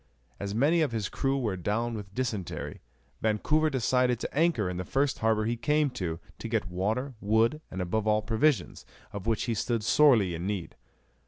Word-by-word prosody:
As 100 Hz, +1 st, -4 dB
many 150 Hz, +8 st, +3 dB
of 150 Hz, -5 st, +1 dB
his 110 Hz, -3 st, -2 dB
crew 135 Hz, 0 st, 0 dB
were 110 Hz, -7 st, -1 dB
down 105 Hz, +6 st, -1 dB
with 105 Hz, -3 st, -7 dB
dysentery, 110 Hz, -8 st, -3 dB, 0.4 s
Vancouver 150 Hz, +9 st, +2 dB
decided 125 Hz, -2 st, +1 dB
to -, -, -5 dB
anchor 155 Hz, -, +2 dB
in 90 Hz, 0 st, -3 dB
the 90 Hz, -, -2 dB
first 140 Hz, +6 st, 0 dB
harbour 110 Hz, -1 st, +2 dB
he 115 Hz, +2 st, 0 dB
came 150 Hz, +3 st, +1 dB
to, 85 Hz, -9 st, -4 dB, 0.2 s
to -, -, -5 dB
get 110 Hz, -5 st, -1 dB
water, 110 Hz, +9 st, -1 dB
wood, 110 Hz, +8 st, +2 dB
and 95 Hz, 0 st, -3 dB
above 110 Hz, +5 st, -1 dB
all 105 Hz, 0 st, +3 dB
provisions, 115 Hz, -, +1 dB, 0.3 s
of 100 Hz, +1 st, -6 dB
which 115 Hz, -2 st, +1 dB
he 120 Hz, -, -1 dB
stood 115 Hz, +1 st, -1 dB
sorely 115 Hz, -9 st, +5 dB
in 85 Hz, +3 st, -4 dB
need. 100 Hz, -5 st, -3 dB
110 Hz, 185 wpm, -28 LUFS, 100-130 Hz, 0.4 s, sorely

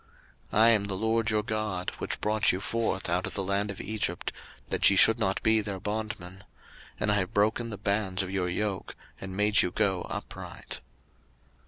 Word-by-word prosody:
03:026:013 -, -, +1 dB
I 115 Hz, -, +8 dB
am 110 Hz, -3 st, +4 dB
the 100 Hz, -, -3 dB
LORD 110 Hz, +3 st, +1 dB
your 105 Hz, -1 st, +1 dB
God, 105 Hz, -4 st, -2 dB
which -, -, -3 dB
brought 105 Hz, 0 st, +3 dB
you 90 Hz, -, -2 dB
forth 110 Hz, -1 st, -1 dB
out 90 Hz, +1 st, 0 dB
of -, -, -7 dB
the 100 Hz, -, -1 dB
land 100 Hz, +2 st, 0 dB
of 100 Hz, -, -6 dB
Egypt, 100 Hz, -5 st, -2 dB, 0.4 s
that -, -, +4 dB
ye 100 Hz, -, +3 dB
should 110 Hz, +4 st, +7 dB
not 95 Hz, -3 st, 0 dB
be 110 Hz, 0 st, +5 dB
their 100 Hz, -2 st, -5 dB
bondmen; 100 Hz, -3 st, -5 dB, 0.6 s
and 105 Hz, -, +1 dB
I 105 Hz, -, +3 dB
have 95 Hz, -2 st, -2 dB
broken 110 Hz, +3 st, +2 dB
the 105 Hz, -, -5 dB
bands 100 Hz, -2 st, 0 dB
of 95 Hz, -, -6 dB
your 95 Hz, -2 st, -1 dB
yoke, 95 Hz, +1 st, -2 dB, 0.2 s
and 95 Hz, 0 st, -7 dB
made 105 Hz, 0 st, +4 dB
you -, -, +1 dB
go 95 Hz, -1 st, +1 dB
upright. -, -, -6 dB
100 Hz, 195 wpm, -28 LUFS, 95-110 Hz, 0.6 s, I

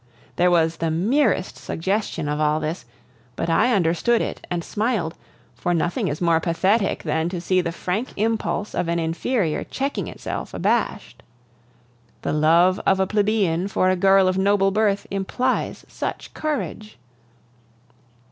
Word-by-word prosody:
There 180 Hz, +1 st, +4 dB
was 165 Hz, -2 st, +2 dB
the 165 Hz, -, -1 dB
merest 205 Hz, -, +1 dB
suggestion 190 Hz, -2 st, -2 dB
of 150 Hz, 0 st, -1 dB
all 155 Hz, 0 st, +2 dB
this, 155 Hz, -4 st, -4 dB, 0.5 s
but 165 Hz, -, -2 dB
I 220 Hz, +9 st, +3 dB
understood 195 Hz, +4 st, +2 dB
it -, -, -4 dB
and 175 Hz, -1 st, -2 dB
smiled, 210 Hz, -7 st, -1 dB, 0.4 s
for 175 Hz, 0 st, -1 dB
nothing 170 Hz, +1 st, 0 dB
is 145 Hz, 0 st, -3 dB
more 170 Hz, -2 st, +3 dB
pathetic 190 Hz, +6 st, +1 dB
than 160 Hz, +1 st, 0 dB
to 180 Hz, -1 st, -4 dB
see 185 Hz, +2 st, +1 dB
the 170 Hz, -, -3 dB
frank 185 Hz, +8 st, -3 dB
impulse 215 Hz, -1 st, -1 dB
of 175 Hz, -, -1 dB
an 170 Hz, 0 st, 0 dB
inferior 165 Hz, +2 st, -1 dB
checking 275 Hz, +1 st, -3 dB
itself -, -, -6 dB
abashed. -, -, -1 dB, 1.0 s
The -, -, -1 dB
love 170 Hz, +5 st, +4 dB
of 190 Hz, -, +3 dB
a 190 Hz, -, +3 dB
plebeian 200 Hz, -4 st, +1 dB
for 185 Hz, -2 st, +2 dB
a -, -, +2 dB
girl 195 Hz, +1 st, +4 dB
of 185 Hz, +1 st, +1 dB
noble 195 Hz, 0 st, +3 dB
birth 205 Hz, -1 st, +1 dB
implies 225 Hz, +7 st, -1 dB
such -, -, -5 dB
courage! 285 Hz, -8 st, -4 dB
185 Hz, 145 wpm, -23 LUFS, 165-210 Hz, 1.0 s, There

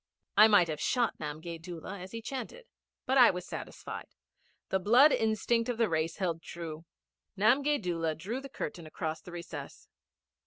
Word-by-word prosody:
I 215 Hz, +2 st, +9 dB
might 205 Hz, -5 st, +5 dB
have 155 Hz, -1 st, -4 dB
shot 245 Hz, -3 st, +1 dB
Namgay 160 Hz, +2 st, -6 dB
Doola 175 Hz, +3 st, -7 dB
as 185 Hz, +1 st, -9 dB
he 230 Hz, 0 st, -6 dB
chanted. 270 Hz, -, -6 dB, 0.4 s
But 265 Hz, +1 st, +3 dB
I 245 Hz, -, +9 dB
was 180 Hz, -1 st, -3 dB
satisfied. -, -, -7 dB, 0.6 s
The 190 Hz, -, +1 dB
blood 245 Hz, +10 st, +6 dB
instinct 225 Hz, +1 st, +1 dB
of 245 Hz, -, -1 dB
the 230 Hz, -3 st, +2 dB
race 160 Hz, 0 st, 0 dB
held 170 Hz, -4 st, -1 dB
true. 165 Hz, -2 st, -7 dB, 0.5 s
Namgay 275 Hz, +8 st, +3 dB
Doola 165 Hz, -4 st, -1 dB
drew 220 Hz, +11 st, -4 dB
the 275 Hz, -, -9 dB
curtain 170 Hz, -, -6 dB
across 155 Hz, 0 st, -4 dB
the 180 Hz, -, -11 dB
recess. 170 Hz, -5 st, -8 dB
185 Hz, 165 wpm, -31 LUFS, 165-230 Hz, 0.6 s, I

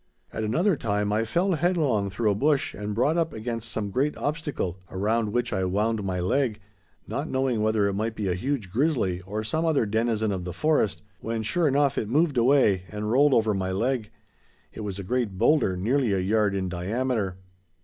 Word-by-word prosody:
At 110 Hz, -, -3 dB
another 165 Hz, -, +2 dB
time 105 Hz, -4 st, -1 dB
I 110 Hz, +1 st, +2 dB
fell 175 Hz, -, +1 dB
headlong 150 Hz, -, +1 dB
through 105 Hz, +2 st, 0 dB
a -, -, +2 dB
bush 140 Hz, +6 st, +1 dB
and 105 Hz, 0 st, -5 dB
brought 140 Hz, +8 st, +2 dB
up 165 Hz, -2 st, -1 dB
against 115 Hz, 0 st, -4 dB
some 105 Hz, -2 st, -3 dB
great 140 Hz, +8 st, 0 dB
obstacle 145 Hz, -, -3 dB
around 105 Hz, +3 st, 0 dB
which 120 Hz, +1 st, -1 dB
I 95 Hz, -2 st, 0 dB
wound 105 Hz, +3 st, 0 dB
my 95 Hz, -2 st, -2 dB
leg, 110 Hz, +4 st, 0 dB, 0.5 s
not -, -, -3 dB
knowing 130 Hz, -4 st, 0 dB
whether 110 Hz, -1 st, +2 dB
it 100 Hz, -, -1 dB
might 110 Hz, +3 st, -2 dB
be 105 Hz, -3 st, -2 dB
a 90 Hz, -, +1 dB
huge 110 Hz, 0 st, -3 dB
grizzly 115 Hz, -, 0 dB
or 105 Hz, +3 st, -4 dB
some 155 Hz, +10 st, -1 dB
other 155 Hz, -8 st, +2 dB
denizen 110 Hz, 0 st, 0 dB
of 95 Hz, -2 st, -3 dB
the 90 Hz, -1 st, -5 dB
forest, 150 Hz, -, +1 dB, 0.2 s
when 115 Hz, 0 st, -3 dB
sure 160 Hz, +9 st, +1 dB
enough 140 Hz, 0 st, +2 dB
it 105 Hz, -, -4 dB
moved 145 Hz, 0 st, +2 dB
away, 120 Hz, -7 st, +4 dB
and 105 Hz, 0 st, -3 dB
rolled 140 Hz, +3 st, +5 dB
over 110 Hz, -2 st, +3 dB
my 95 Hz, -1 st, -2 dB
leg. 115 Hz, +2 st, -1 dB, 0.6 s
It -, -, -9 dB
was 100 Hz, -3 st, -4 dB
a 100 Hz, -, -5 dB
great 110 Hz, -2 st, -1 dB
boulder 120 Hz, -8 st, +3 dB
nearly 120 Hz, +3 st, +1 dB
a 95 Hz, -, +1 dB
yard 105 Hz, +1 st, +1 dB
in 95 Hz, -1 st, -1 dB
diameter. 100 Hz, +2 st, -2 dB
110 Hz, 200 wpm, -26 LUFS, 100-135 Hz, 0.6 s, rolled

